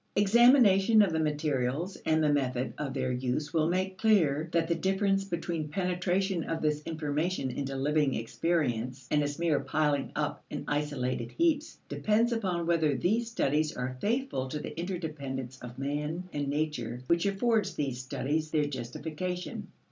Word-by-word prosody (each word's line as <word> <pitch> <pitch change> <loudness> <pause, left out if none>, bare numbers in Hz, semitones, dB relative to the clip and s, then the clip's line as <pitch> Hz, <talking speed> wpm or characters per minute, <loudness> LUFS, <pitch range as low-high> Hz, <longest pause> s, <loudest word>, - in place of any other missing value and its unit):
Examination 220 -1 +6
of 185 -5 0
the 160 - +1
materials 150 +2 -1
and 160 0 +3
the 150 -1 +3
method 130 -2 -1
of 145 -2 -2
their 130 - 0
use 125 +4 -2
will 160 -1 +2
make 185 +1 -1
clear 160 -8 +3
that 165 -1 +1
the 170 - +2
difference 195 +2 +1
between 170 -4 -3
penetration 180 +1 0
of 165 -1 -2
this 150 -1 0
information 155 -1 -1
into 135 +1 -3
living 145 0 +1
experience 125 -1 -1
and 150 - +3
its 145 0 -2
mere 165 -4 +2
piling 150 -3 0
up - - -2
in - - -4
isolated 130 -5 -1
heaps 320 -2 +1
depends 225 +3 +1
upon 185 -7 -1
whether 160 -4 +2
these 225 - +1
studies 155 -7 0
are 125 +1 -3
faithful 230 - 0
to 130 - -4
the - - -6
interdependence 145 -8 -4
of 125 0 -9
man 150 +5 -2
and 145 -1 -2
nature 140 -5 -2
which 170 +6 +2
affords 205 0 +1
these 135 -4 -2
studies 150 +4 -2
their 155 -2 +2
justification. 155 +7 -4
155 Hz, 155 wpm, -30 LUFS, 140-185 Hz, -, Examination